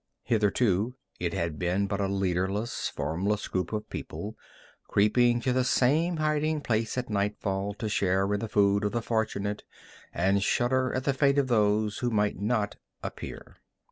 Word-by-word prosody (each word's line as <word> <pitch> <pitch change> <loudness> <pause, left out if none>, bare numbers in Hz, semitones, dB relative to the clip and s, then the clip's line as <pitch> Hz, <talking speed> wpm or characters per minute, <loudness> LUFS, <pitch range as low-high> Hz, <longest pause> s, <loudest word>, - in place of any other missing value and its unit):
Hitherto 110 0 +1 0.2
it 85 -1 -1
had 85 -3 -2
been 90 +3 +1
but 100 0 -2
a 100 - +1
leaderless, 95 +3 -1
formless 90 +8 -1
group 95 -1 -2
of 105 -1 -3
people, - - -6 0.5
creeping 120 +4 +3
to 125 +1 +1
the 130 0 +2
same 155 +7 +2
hiding 155 0 +1
place 115 -2 -1
at 125 0 -1
nightfall 100 -1 -1
to 110 - -4
share 95 -1 +1
in 105 - 0
the 110 - -4
food 100 0 +3
of 105 - -1
the 120 -1 -1
fortunate, 105 -3 -1 0.5
and 95 +4 +2
shudder 130 +5 +1
at 130 - -1
the 140 - +1
fate 140 +1 +3
of 135 -2 +2
those 105 -2 +2
who 125 - 0
might 105 -4 0
not 105 -1 0 0.3
appear. - - -7
105 Hz, 165 wpm, -28 LUFS, 100-125 Hz, 0.5 s, creeping